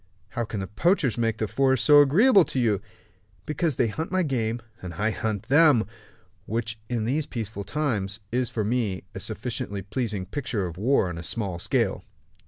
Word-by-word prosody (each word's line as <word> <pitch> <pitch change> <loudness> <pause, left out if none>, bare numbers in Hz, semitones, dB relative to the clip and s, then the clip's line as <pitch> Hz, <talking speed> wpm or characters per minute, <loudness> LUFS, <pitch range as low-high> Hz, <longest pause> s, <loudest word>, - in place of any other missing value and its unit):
"How 120 +3 -2
can 105 -1 -5
the - - -3
poachers 130 - +1
make 115 -2 0
the 110 - -1
forest 130 +2 +2
so 145 -1 +8
agreeable 195 - +6
to 130 - -3
you?" 105 -5 +2 0.6
"Because 155 -1 0
they 120 - +2
hunt 160 +11 -4
my 185 -1 +2
game, 120 -6 -1 0.2
and 90 -3 -7
I 110 +6 0
hunt 110 -3 -2
them 145 -5 +5 0.6
which, 110 0 -2
in 115 -3 -1
these 145 +5 0
peaceful 110 -4 -5
times, 105 -5 -2
is 125 0 0
for 110 - -2
me 105 -4 -1
a - - -6
sufficiently 100 -1 -4
pleasing 105 -1 -2
picture 110 -2 -3
of 85 0 -7
war 120 -2 +3
on 85 -1 -5
a - - -7
small 95 -1 -2
scale." - - 0
115 Hz, 185 wpm, -26 LUFS, 100-135 Hz, 0.6 s, so